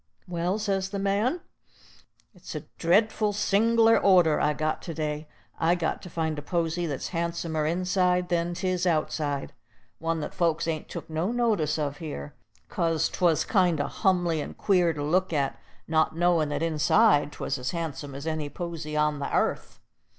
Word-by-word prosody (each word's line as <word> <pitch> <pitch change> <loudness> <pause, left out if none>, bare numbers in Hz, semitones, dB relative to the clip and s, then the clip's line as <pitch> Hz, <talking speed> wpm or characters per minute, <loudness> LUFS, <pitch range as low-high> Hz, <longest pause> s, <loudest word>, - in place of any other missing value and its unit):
"Well," 175 +2 -1
says 195 -3 -1
the 200 - -4
man, 205 - 0 0.9
"it's 180 -3 -10
a 150 - -3 0.2
dreadful 210 +4 +2
sing'lar 225 +3 +4
order 180 -6 +4
I've 150 0 +1
got 155 0 -1
to 165 - -6
day. 150 -1 -3 0.3
I 165 +2 +3
got 165 -3 -2
to 180 - -9
find 160 -2 -2
a - - -6
posy 170 +2 -1
that's 140 -4 -4
handsomer 170 -2 -2
inside 180 +1 +1
than 175 0 0
'tis 185 0 -1
outside, 155 -3 -1 0.5
one 165 0 -1
that 150 - -5
folks 165 -2 0
ain't 160 -2 -3
took - - -7
no 160 +6 -1
notice 215 -11 +1
of 145 -2 -2
here, 145 - -6 0.3
'cause 165 -2 0
'twas 170 -4 +2
kind 180 -6 +2
o' 145 - +1
humly 175 -5 +1
and - - -7
queer 180 -4 +3
to 145 -2 -4
look 180 +5 +1
at, 140 -3 -1 0.3
not 160 0 +1
knowin' 170 -3 +2
that 145 +2 -2
inside 155 0 +3
'twas 135 - -3
as 125 - -3
handsome 155 -5 -4
as 140 +2 -7
any 155 -2 -2
posy 155 -1 -5
on 150 -1 +1
the 140 - -3
airth. - - -1
165 Hz, 170 wpm, -27 LUFS, 155-185 Hz, 0.9 s, sing'lar